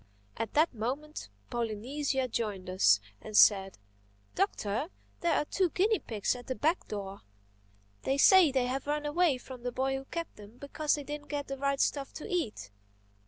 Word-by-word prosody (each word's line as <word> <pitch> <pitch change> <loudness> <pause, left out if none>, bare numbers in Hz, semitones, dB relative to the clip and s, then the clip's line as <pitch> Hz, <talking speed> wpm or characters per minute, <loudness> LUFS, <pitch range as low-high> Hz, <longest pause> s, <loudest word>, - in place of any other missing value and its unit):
At 225 -2 -4
that 310 +1 +4
moment 260 - -4 0.2
Polynesia 255 +4 -1
joined 205 -6 -3
us 105 - +5 0.2
and 215 -1 -2
said, 195 -2 +5 0.6
"Doctor, 285 - -1 0.3
there 340 -2 +2
are - - +1
two 370 +3 +1
guinea 410 +6 +2
pigs 215 +1 -1
at 245 -1 -10
the 260 - -2
back 320 +7 0
door. 200 -2 -6 0.8
They 270 - 0
say 360 +1 +7
they 260 -2 +1
have 265 +3 -3
run 295 0 -1
away 300 -1 +2
from 250 0 -10
the 245 0 -3
boy 265 +2 0
who 270 - -8
kept 335 +3 -6
them 210 +3 -13
because 290 +2 -1
they 295 - -6
didn't 295 +1 -7
get 290 -1 -2
the 275 - -4
right 275 0 0
stuff 280 -2 0
to - - -7
eat. 230 - -3
270 Hz, 175 wpm, -30 LUFS, 220-300 Hz, 0.8 s, say